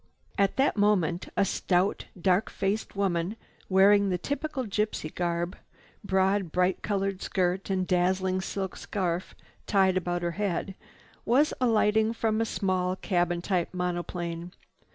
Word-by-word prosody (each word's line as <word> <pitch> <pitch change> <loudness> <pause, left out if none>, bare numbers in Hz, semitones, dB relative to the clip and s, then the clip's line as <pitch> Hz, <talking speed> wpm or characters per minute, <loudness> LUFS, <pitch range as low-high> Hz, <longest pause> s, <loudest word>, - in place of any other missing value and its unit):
At 200 -1 +2
that 270 -3 +2
moment 190 -4 +2
a 200 - +4
stout 185 0 0
dark 185 +3 +2
faced 200 +3 -2
woman, 190 0 0 0.3
wearing 200 +1 +5
the 180 - +1
typical 285 - -3
gypsy 210 -6 -2
garb, 175 +1 -1 0.5
broad, 190 -2 +1
bright 180 +2 +1
colored 195 -2 -1
skirt 185 +1 -1
and 185 -1 0
dazzling 185 +1 +1
silk 190 -1 -4
scarf 180 -3 -3 0.3
tied 190 -2 +3
about 175 -1 -2
her 170 - 0
head, 195 0 -2 0.5
was 275 +7 +3
alighting 220 -2 +3
from 225 -1 0
a - - +2
small 185 -4 0
cabin 175 -3 0
type 185 -2 -1
monoplane. 175 -1 -3
190 Hz, 130 wpm, -28 LUFS, 180-205 Hz, 0.5 s, wearing